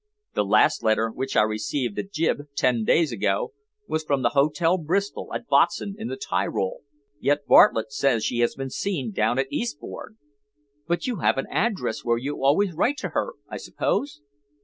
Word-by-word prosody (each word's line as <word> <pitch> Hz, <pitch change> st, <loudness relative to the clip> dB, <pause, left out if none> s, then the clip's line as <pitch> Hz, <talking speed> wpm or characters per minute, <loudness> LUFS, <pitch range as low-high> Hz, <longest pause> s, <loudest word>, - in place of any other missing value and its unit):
"The -, -, +1 dB
last -, -, +3 dB
letter, 110 Hz, 0 st, +1 dB
which 130 Hz, +3 st, -4 dB
I -, -, +6 dB
received 110 Hz, +2 st, -2 dB
at 195 Hz, -, -5 dB
Gib. 155 Hz, -4 st, -1 dB
ten 125 Hz, -4 st, +2 dB
days 160 Hz, +5 st, +3 dB
ago, 440 Hz, -, -1 dB, 0.3 s
was 155 Hz, 0 st, -1 dB
from 140 Hz, -3 st, 0 dB
the -, -, +4 dB
Hotel 155 Hz, +5 st, +2 dB
Bristol, 190 Hz, +6 st, -2 dB
at -, -, -5 dB
Botzen, 200 Hz, -, +2 dB
in 220 Hz, +1 st, -6 dB
the 130 Hz, -, -5 dB
Tyrol, 95 Hz, -4 st, -2 dB, 0.4 s
yet 145 Hz, +1 st, +1 dB
Bartlett 110 Hz, +4 st, +5 dB
says 135 Hz, -5 st, +1 dB
she 120 Hz, -, -1 dB
has 120 Hz, -, +2 dB
been 135 Hz, -1 st, -5 dB
seen 145 Hz, -, -2 dB
down 110 Hz, +4 st, +1 dB
at 135 Hz, 0 st, -1 dB
Eastbourne." 230 Hz, -2 st, -5 dB, 0.7 s
"But 170 Hz, -1 st, -1 dB
you 245 Hz, -4 st, -2 dB
have 155 Hz, -, +2 dB
an 135 Hz, -, -1 dB
address 195 Hz, -, -1 dB
where 120 Hz, 0 st, +1 dB
you 135 Hz, +3 st, -4 dB
always 170 Hz, +7 st, +3 dB
write 245 Hz, -, +1 dB
to -, -, -4 dB
her, -, -, -2 dB
I -, -, -6 dB
suppose?" 280 Hz, -, -2 dB
140 Hz, 180 wpm, -24 LUFS, 120-180 Hz, 0.7 s, I